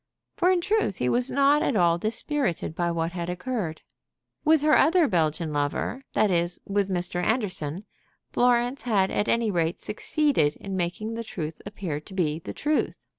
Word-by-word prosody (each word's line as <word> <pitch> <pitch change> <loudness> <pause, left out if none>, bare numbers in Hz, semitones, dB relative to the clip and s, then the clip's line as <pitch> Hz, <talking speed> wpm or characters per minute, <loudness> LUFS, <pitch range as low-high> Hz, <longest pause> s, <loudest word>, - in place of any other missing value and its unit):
For, 365 -3 +3
in 365 -2 +3
truth, 415 - 0
he 125 - 0
was 245 - +2
not 280 +1 +4
at 260 - +1
all 170 -3 +3
dispirited 225 - -1
by 170 +1 -1
what 165 0 -1
had 175 -1 -4
occurred. 180 -3 -3 0.6
With 315 -1 +4
her 305 0 +5
other 330 +2 +5
Belgian 160 - 0
lover, 145 - -2
that 210 - +3
is, 175 0 0
with 200 -1 0
Mr. 180 -1 -2
Anderson, 185 - -1 0.5
Florence 245 +1 +2
had 205 -5 +1
at 205 - 0
any 230 -2 +2
rate 170 -2 0
succeeded 260 - 0
in 195 -1 -6
making 185 +5 -2
the 230 0 -4
truth 160 -8 -6
appear 185 -7 -4
to 155 - -14
be 160 -4 0
the - - -7
truth. 300 +1 -1
195 Hz, 175 wpm, -26 LUFS, 170-250 Hz, 0.6 s, her